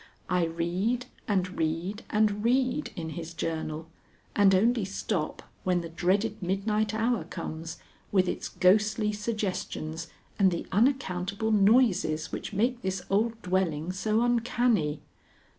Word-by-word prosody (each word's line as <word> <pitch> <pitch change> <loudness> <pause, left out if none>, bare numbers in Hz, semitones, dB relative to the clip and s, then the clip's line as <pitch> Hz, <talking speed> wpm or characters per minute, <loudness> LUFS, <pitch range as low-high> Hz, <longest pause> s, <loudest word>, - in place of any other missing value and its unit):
I 180 -2 +3
read 180 +9 -1 0.2
and 185 -3 0
read 165 +7 -1
and 210 -1 +2
read 255 +4 +1
in 165 -4 -4
his 165 +1 -7
journal, 160 -1 -3 0.5
and 195 -2 +6
only 230 +3 +3
stop 190 -3 -3 0.2
when 180 -1 +1
the 165 - -7
dreaded 195 +6 0
midnight 210 +4 0
hour 230 +1 +1
comes 165 -1 -6 0.3
with 185 -2 +3
its - - -3
ghostly 210 +3 +3
suggestions 190 -6 -3 0.3
and 195 -2 +6
the 170 -2 -3
unaccountable 210 -3 +1
noises 195 -7 +3
which - - -5
make 235 +5 0
this 190 -2 -2
old 225 +3 +1
dwelling 180 -3 0
so 215 +4 +1
uncanny. 235 -10 +1
195 Hz, 125 wpm, -28 LUFS, 175-220 Hz, 0.5 s, and